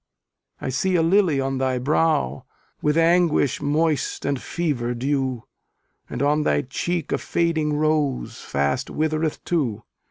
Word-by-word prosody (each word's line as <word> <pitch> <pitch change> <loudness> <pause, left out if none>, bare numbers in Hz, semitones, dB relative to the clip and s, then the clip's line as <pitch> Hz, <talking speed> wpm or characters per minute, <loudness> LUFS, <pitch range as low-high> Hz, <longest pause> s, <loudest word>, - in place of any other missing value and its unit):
I - - -4
see 180 +9 0
a 165 - +3
lily 170 -4 +3
on 135 0 -1
thy 130 -1 0
brow, 145 - +1 0.4
With 150 +1 +1
anguish 165 -5 +3
moist 150 0 0
and 140 -2 -1
fever 130 -8 -2
dew; 130 -1 -1 0.7
And - - -3
on 150 +2 +2
thy 145 - +1
cheek 170 +6 -3
a - - +1
fading 160 -3 0
rose 150 -3 0
Fast 70 - -1
withereth 155 0 -1
too. 120 -11 -1
150 Hz, 135 wpm, -23 LUFS, 130-165 Hz, 0.7 s, a